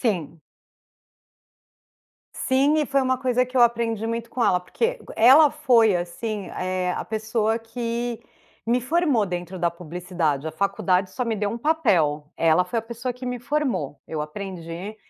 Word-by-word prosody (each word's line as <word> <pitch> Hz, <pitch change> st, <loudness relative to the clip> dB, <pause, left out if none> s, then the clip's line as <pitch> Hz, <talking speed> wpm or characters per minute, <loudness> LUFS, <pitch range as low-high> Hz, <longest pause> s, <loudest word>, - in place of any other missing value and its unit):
Sim. 170 Hz, -, -2 dB, 1.9 s
Sim 275 Hz, +4 st, +2 dB
e 300 Hz, -, +1 dB
foi 275 Hz, 0 st, +2 dB
uma 260 Hz, 0 st, +1 dB
coisa 250 Hz, -1 st, +1 dB
que 255 Hz, +1 st, -8 dB
eu 250 Hz, -, +5 dB
aprendi 230 Hz, -2 st, +2 dB
muito 230 Hz, 0 st, -4 dB
com 250 Hz, -, -2 dB
ela, 180 Hz, -, +3 dB
porque 460 Hz, -, -2 dB, 0.2 s
ela 275 Hz, +7 st, +7 dB
foi, 245 Hz, -9 st, +4 dB
assim, 195 Hz, +4 st, -4 dB
eh, 185 Hz, 0 st, -1 dB
a -, -, -3 dB
pessoa 220 Hz, +1 st, -1 dB
que 235 Hz, 0 st, -4 dB, 0.5 s
me 240 Hz, +2 st, +2 dB
formou 275 Hz, -4 st, +1 dB
dentro 180 Hz, 0 st, -5 dB
da 170 Hz, 0 st, +1 dB
publicidade. 170 Hz, -3 st, -3 dB
A 160 Hz, -, -4 dB
faculdade 185 Hz, +1 st, 0 dB
só 250 Hz, +5 st, -3 dB
me 225 Hz, -2 st, -1 dB
deu 205 Hz, 0 st, -1 dB
um 230 Hz, -, -4 dB
papel, 185 Hz, -, +1 dB
ela 165 Hz, +2 st, +3 dB
foi 230 Hz, +6 st, -2 dB
a -, -, -2 dB
pessoa 240 Hz, +2 st, -4 dB
que 250 Hz, +1 st, -9 dB
me 250 Hz, 0 st, -3 dB
formou, 240 Hz, -, -2 dB
eu 155 Hz, -2 st, -3 dB
aprendi 180 Hz, +3 st, -7 dB
225 Hz, 165 wpm, -24 LUFS, 180-250 Hz, 1.9 s, ela